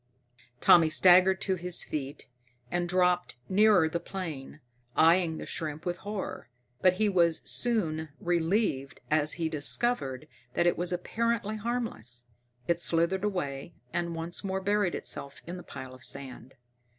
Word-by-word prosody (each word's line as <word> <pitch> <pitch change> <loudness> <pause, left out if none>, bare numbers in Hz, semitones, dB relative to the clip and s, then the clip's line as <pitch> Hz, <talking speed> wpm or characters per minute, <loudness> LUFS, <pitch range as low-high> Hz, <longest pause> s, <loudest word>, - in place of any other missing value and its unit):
Tommy 165 -2 +6
staggered 185 +3 +6
to 190 - 0
his 180 -1 +2
feet 140 -1 -6 0.4
and 175 0 -1
dropped 180 -2 +1
nearer 200 -4 +4
the 170 +2 -2
plane, 165 -6 -7 0.4
eyeing 165 0 +4
the - - -7
shrimp 155 0 -5
with 175 0 -2
horror. 190 - -6 0.3
But 185 -1 +5
he 215 +3 +1
was 170 -4 +2
soon 160 -10 +2
relieved 170 -5 -1
as 155 0 +2
he 165 -2 -2
discovered 150 - +1 0.3
that 175 - +2
it 175 - +3
was 175 +1 0
apparently 215 +4 -1
harmless. 220 - -3 0.4
It 170 0 +1
slithered 170 +3 +2
away 170 -7 -3 0.2
and 170 -1 -2
once 165 +4 -5
more 190 -1 -2
buried 205 -1 0
itself 140 - -4
in 175 +2 -6
the - - -8
pile 130 -5 -9
of 130 0 -15
sand. 135 -2 -7
175 Hz, 145 wpm, -29 LUFS, 155-190 Hz, 0.4 s, Tommy